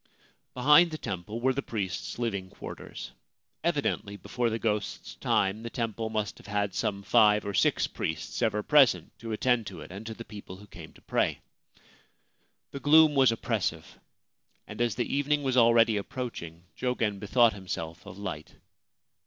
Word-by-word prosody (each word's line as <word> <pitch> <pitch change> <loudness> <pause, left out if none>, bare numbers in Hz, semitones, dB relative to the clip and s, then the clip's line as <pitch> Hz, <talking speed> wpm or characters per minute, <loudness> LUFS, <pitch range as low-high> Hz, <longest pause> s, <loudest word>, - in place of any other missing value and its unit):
Behind 150 +7 +6
the 155 - -5
temple 105 - -5
were 130 +1 +3
the 140 - -2
priests' 100 -8 -4
living 100 -6 -2
quarters; - - -9 0.5
evidently, 100 0 -1
before 120 +3 -1
the 110 - -1
ghost's 105 -2 -2
time, 100 +2 0
the 115 - -5
temple 115 -2 -3
must 110 -2 -3
have - - -15
had 100 -1 -1
some 100 -1 -2
five 105 +1 +4
or 100 - -3
six - - +3
priests 80 +7 -4
ever 105 -3 +1
present 125 - +4
to 115 -1 -6
attend 115 0 +1
to 90 -4 -8
it 75 - -10
and 100 +3 -7
to 110 - -5
the 115 - -9
people 100 -3 -10
who 100 +2 -13
came 105 - -12
to - - -19
pray. - - 0 1.3
The 140 - -6
gloom 155 +2 +6
was 135 -3 +5
oppressive, 115 - -3 0.7
and 105 +2 -7
as 120 -4 +1
the 120 - 0
evening 145 +1 +1
was 130 -2 0
already 115 -2 +5
approaching 100 -7 -6
Jogen 115 -5 -1
bethought 115 +3 +4
himself 90 -4 -6
of 100 -2 -9
light. 90 -7 -6
110 Hz, 165 wpm, -28 LUFS, 100-125 Hz, 1.3 s, Behind